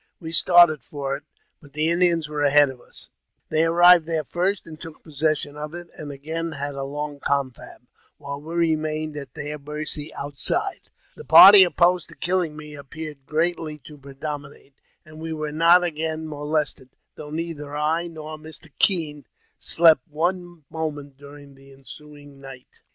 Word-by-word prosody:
We 160 Hz, -2 st, -7 dB
started 170 Hz, -3 st, +6 dB
for 135 Hz, +2 st, -4 dB
it, 145 Hz, +1 st, -11 dB, 0.4 s
but 145 Hz, -3 st, -18 dB
the 155 Hz, +2 st, 0 dB
Indians 170 Hz, -2 st, +1 dB
were 150 Hz, -1 st, -4 dB
ahead 145 Hz, -1 st, +4 dB
of 125 Hz, -2 st, -15 dB
us; -, -, -6 dB, 0.4 s
they 160 Hz, +1 st, +2 dB
arrived 175 Hz, 0 st, +6 dB
there 160 Hz, -2 st, -1 dB
first, 185 Hz, +5 st, -2 dB
and 155 Hz, -1 st, -12 dB
took 160 Hz, -2 st, -11 dB
possession 155 Hz, -1 st, -2 dB
of 150 Hz, +2 st, -7 dB
it, 175 Hz, -1 st, -9 dB
and 150 Hz, -2 st, -8 dB
again 160 Hz, +4 st, -5 dB
had 145 Hz, -1 st, -5 dB
a 135 Hz, -, -6 dB
long 145 Hz, +1 st, -5 dB
confab, 135 Hz, -3 st, -3 dB, 0.3 s
while 140 Hz, -1 st, -7 dB
we 160 Hz, +3 st, -8 dB
remained 155 Hz, -2 st, -1 dB
at 140 Hz, -4 st, -8 dB
their 150 Hz, 0 st, -6 dB
mercy 150 Hz, +1 st, -7 dB
outside. 140 Hz, -1 st, -3 dB, 0.3 s
The -, -, -11 dB
party 195 Hz, 0 st, +10 dB
opposed 175 Hz, 0 st, +2 dB
to -, -, -14 dB
killing 175 Hz, -3 st, -1 dB
me 150 Hz, -1 st, -10 dB
appeared 145 Hz, 0 st, -9 dB
greatly 160 Hz, -1 st, -1 dB
to 150 Hz, -, -11 dB
predominate, 140 Hz, 0 st, -9 dB, 0.3 s
and 155 Hz, 0 st, -13 dB
we 160 Hz, 0 st, -5 dB
were 155 Hz, -1 st, -4 dB
not 170 Hz, +3 st, +5 dB
again 160 Hz, -1 st, -3 dB
molested, 150 Hz, -3 st, -3 dB, 0.2 s
though 150 Hz, -, -10 dB
neither 150 Hz, -2 st, -5 dB
I 160 Hz, +3 st, 0 dB
nor 155 Hz, -2 st, -9 dB
Mr. 155 Hz, 0 st, -11 dB
Kean 155 Hz, -7 st, 0 dB, 0.3 s
slept 160 Hz, -6 st, +4 dB
one 175 Hz, +1 st, -3 dB
moment 145 Hz, -3 st, -5 dB
during 145 Hz, 0 st, -14 dB
the 135 Hz, 0 st, -18 dB
ensuing 145 Hz, +1 st, -14 dB
night. 135 Hz, -2 st, -13 dB
155 Hz, 160 wpm, -23 LUFS, 145-165 Hz, 0.4 s, party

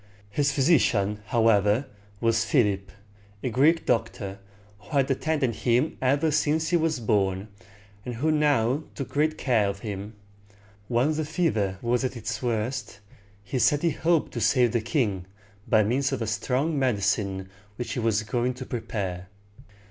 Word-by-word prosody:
His 140 Hz, +4 st, +1 dB
physician, 120 Hz, -, +2 dB
however, 110 Hz, +1 st, +3 dB, 0.3 s
was 115 Hz, -1 st, +2 dB
Philip, 105 Hz, -6 st, +1 dB, 0.5 s
a 125 Hz, -, -1 dB
Greek 155 Hz, +7 st, +3 dB
doctor, 110 Hz, -4 st, -1 dB, 0.4 s
who -, -, -19 dB
had 135 Hz, 0 st, +2 dB
attended 135 Hz, -2 st, 0 dB
him 125 Hz, +5 st, +1 dB
ever 140 Hz, +4 st, +2 dB
since 155 Hz, +1 st, +1 dB
he 175 Hz, -, +2 dB
was 160 Hz, -4 st, +1 dB
born, 100 Hz, -3 st, 0 dB, 0.5 s
and 125 Hz, 0 st, -5 dB
who 155 Hz, +7 st, +1 dB
now 145 Hz, -3 st, +2 dB
took 135 Hz, -, -5 dB
great 155 Hz, +2 st, 0 dB
care 115 Hz, -6 st, +2 dB
of 100 Hz, 0 st, -6 dB
him. 105 Hz, 0 st, -6 dB, 0.7 s
When 125 Hz, +6 st, +2 dB
the 155 Hz, +1 st, -1 dB
fever 145 Hz, -, 0 dB
was 120 Hz, +1 st, +1 dB
at 130 Hz, -1 st, -2 dB
its 110 Hz, -1 st, -4 dB
worst, 120 Hz, -1 st, -2 dB, 0.4 s
he 105 Hz, +6 st, -3 dB
said 145 Hz, +4 st, +3 dB
he 170 Hz, -, +3 dB
hoped 165 Hz, 0 st, +1 dB
to 120 Hz, -, -3 dB
save 120 Hz, +2 st, +3 dB
the 120 Hz, -1 st, 0 dB
king 110 Hz, -, -1 dB, 0.4 s
by 110 Hz, -1 st, +4 dB
means 135 Hz, +6 st, 0 dB
of 130 Hz, -4 st, -2 dB
a -, -, -2 dB
strong 130 Hz, +8 st, -1 dB
medicine 100 Hz, -6 st, 0 dB, 0.3 s
which 120 Hz, +2 st, -5 dB
he -, -, -2 dB
was 110 Hz, -2 st, +1 dB
going 120 Hz, +3 st, -1 dB
to 130 Hz, +1 st, -7 dB
prepare. 95 Hz, -7 st, -4 dB
120 Hz, 155 wpm, -26 LUFS, 105-140 Hz, 0.7 s, by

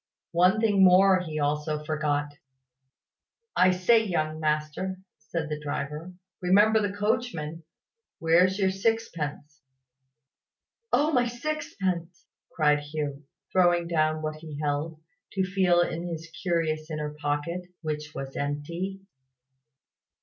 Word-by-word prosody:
One 180 Hz, +5 st, +4 dB
thing 205 Hz, -3 st, +4 dB
more 185 Hz, +1 st, +6 dB
he 160 Hz, -4 st, -5 dB
also 150 Hz, +1 st, -1 dB
forgot. 145 Hz, -1 st, -1 dB, 1.2 s
"I 185 Hz, -, +6 dB
say, 185 Hz, +5 st, +4 dB
young 155 Hz, -6 st, -1 dB
master," 155 Hz, +5 st, -1 dB, 0.2 s
said 165 Hz, -2 st, -4 dB
the 150 Hz, 0 st, -4 dB
driver, 150 Hz, +4 st, -5 dB, 0.3 s
"remember 205 Hz, +5 st, +5 dB
the 205 Hz, -1 st, 0 dB
coachman. 205 Hz, -7 st, -2 dB, 0.5 s
Where's 175 Hz, +4 st, +4 dB
your 190 Hz, -2 st, +2 dB
sixpence?" 170 Hz, -8 st, -2 dB, 1.3 s
"Oh, 300 Hz, +2 st, +3 dB
my 250 Hz, -4 st, +3 dB
sixpence!" 235 Hz, -, -3 dB, 0.3 s
cried 150 Hz, -2 st, +3 dB
Hugh, 145 Hz, -1 st, -5 dB, 0.3 s
throwing 175 Hz, -2 st, +3 dB
down 155 Hz, -1 st, +1 dB
what 155 Hz, 0 st, -3 dB
he 155 Hz, -2 st, -9 dB
held, 150 Hz, +2 st, -2 dB, 0.3 s
to 190 Hz, -, +1 dB
feel 185 Hz, -2 st, +3 dB
in 175 Hz, 0 st, -2 dB
his 165 Hz, -1 st, -6 dB
curious 165 Hz, -3 st, 0 dB
inner 150 Hz, -1 st, -3 dB
pocket, 150 Hz, +3 st, -2 dB, 0.2 s
which 150 Hz, -1 st, -4 dB
was 135 Hz, 0 st, -6 dB
empty. 170 Hz, +7 st, -3 dB
165 Hz, 115 wpm, -27 LUFS, 150-190 Hz, 1.3 s, more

